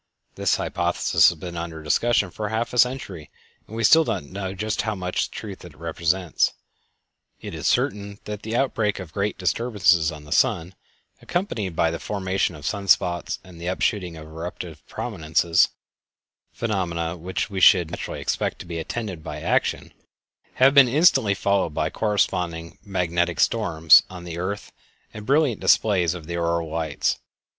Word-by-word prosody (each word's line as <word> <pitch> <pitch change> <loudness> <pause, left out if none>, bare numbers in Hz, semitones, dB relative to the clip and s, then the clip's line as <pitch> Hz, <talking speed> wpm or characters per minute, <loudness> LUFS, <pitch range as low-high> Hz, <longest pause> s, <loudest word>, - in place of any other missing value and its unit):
This - - +1
hypothesis - - +2
has 85 - -6
been 85 +2 -7
under 85 -2 -6
discussion 105 +4 +2
for 105 +2 -4
half 115 +2 -2
a 125 - 0
century, 115 - 0 0.4
and 110 +1 -2
still 160 +9 +7
we - - -1
do - - +1
not - - -4
know 95 +5 -5
just 110 +2 -1
how 110 -2 -2
much 90 -1 -2
truth 100 -4 -8
it 85 -4 -13
represents. 85 +1 0 0.9
It - - -8
is - - -3
certain 100 0 0
that 105 -1 -6
the 110 +1 -4
outbreak 115 -5 0
of 90 -4 -8
great 100 +1 -1
disturbances 95 -5 +2
on 75 -1 -10
the 75 - -14
sun, 95 -8 +2 0.5
accompanied 110 - -2
by 80 0 +2
the 85 - -4
formation 95 -3 -1
of 75 -2 -10
sun 100 +2 -3
spots 85 -2 +2
and 90 -3 -13
the 85 - -5
upshooting 90 -2 -1
of 75 - -10
eruptive 80 0 -8
prominences 85 -5 +1 0.8
(phenomena 85 -7 -2
which 90 +4 -4
we 95 - -3
should 90 -3 +6
naturally - - -5
expect - - -1
to - - -9
be 85 -1 -5
attended 95 -1 -5
by - - -6
action), - - -1 0.6
have 135 +2 +5
been 140 -3 +8
instantly 135 - +4
followed 95 -6 0
by 80 +1 0
corresponding 90 -6 -1
"magnetic 85 -3 -1
storms" 80 -8 +5
on 90 -2 -9
the 85 -1 -6
earth 100 +3 -4 0.4
and 105 -1 -9
brilliant 140 -5 +2
displays 90 -5 +3
of 85 -3 -9
the 85 +1 -4
auroral 85 -1 -1
lights. 80 -3 -1
90 Hz, 165 wpm, -24 LUFS, 85-105 Hz, 0.9 s, been